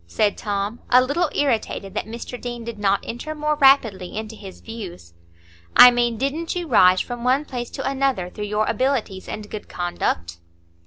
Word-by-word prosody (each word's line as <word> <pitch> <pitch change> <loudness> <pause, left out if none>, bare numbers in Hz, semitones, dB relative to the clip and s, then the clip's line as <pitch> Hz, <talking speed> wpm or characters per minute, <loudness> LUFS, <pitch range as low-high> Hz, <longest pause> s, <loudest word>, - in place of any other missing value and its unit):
said 205 - +1
Tom, 205 +2 -3
a 250 - +7
little 290 +6 +1
irritated 225 -7 -1
that 215 - -3
Mr 235 +2 -7
Deane 240 -1 -5
did 230 -2 -7
not 200 -1 +1
enter 310 +7 -6
more 300 0 0
rapidly 225 -10 +3
into 220 0 -5
his 195 -3 -11
views. 185 - -9 0.6
"I 250 - +11
mean, 240 -1 0
didn't 295 +8 -2
you 350 -1 -3
rise 185 -8 +5
from 240 -1 -6
one 260 +4 +2
place 245 -4 -5
to - - -4
another 265 -9 0
through 210 - -5
your 210 +1 0
abilities 230 -5 -1
and 210 -1 -6
good 210 0 -8
conduct?" 85 - -3
230 Hz, 175 wpm, -22 LUFS, 200-265 Hz, 0.6 s, I